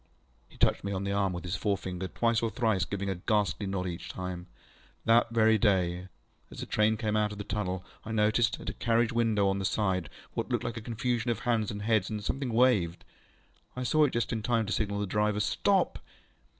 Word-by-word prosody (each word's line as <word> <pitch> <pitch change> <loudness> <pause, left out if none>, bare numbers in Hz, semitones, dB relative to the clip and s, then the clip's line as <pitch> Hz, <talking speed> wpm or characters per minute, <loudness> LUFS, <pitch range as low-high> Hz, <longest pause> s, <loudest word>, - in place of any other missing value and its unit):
ŌĆØ - - -30
He - - -16
touched - - +2
me 100 - -3
on 95 0 -2
the 100 - -2
arm 100 -1 +1
with 90 -1 -5
his 90 +1 -2
forefinger 95 -1 -2
twice 115 +2 +1
or 115 - 0
thrice 110 -7 +1
giving 100 +2 -4
a 95 - 0
ghastly 105 +2 0
nod 95 -1 -2
each 85 -1 -5
time:ŌĆö 90 -1 -5 0.6
ŌĆ£That 115 +1 +5
very 110 -1 +4
day, 90 -3 +1 0.4
as - - -10
a - - -5
train 110 +1 +2
came 110 -1 -1
out 105 -1 +1
of 105 - -7
the 105 - -4
tunnel, 95 -3 -3 0.2
I 110 - -6
noticed, 110 +2 +2
at - - -4
a - - -11
carriage 115 0 +1
window 110 -4 +2
on 95 0 +1
my - - -3
side, 95 -4 0 0.2
what - - -3
looked - - 0
like 115 - -4
a - - -5
confusion 120 +1 -1
of 115 -1 -1
hands 115 -4 +1
and 105 0 -5
heads, 110 -3 +2
and 105 -1 -4
something 135 +2 -2
waved. 110 -8 +2 0.7
I 125 - -3
saw 155 +5 +3
it 140 - -2
just 120 0 -1
in 110 - -2
time 115 0 +1
to - - -2
signal 100 -1 -1
the 105 - 0
driver, 105 +2 0
Stop! - - +1
105 Hz, 225 wpm, -29 LUFS, 95-115 Hz, 0.7 s, ŌĆ£That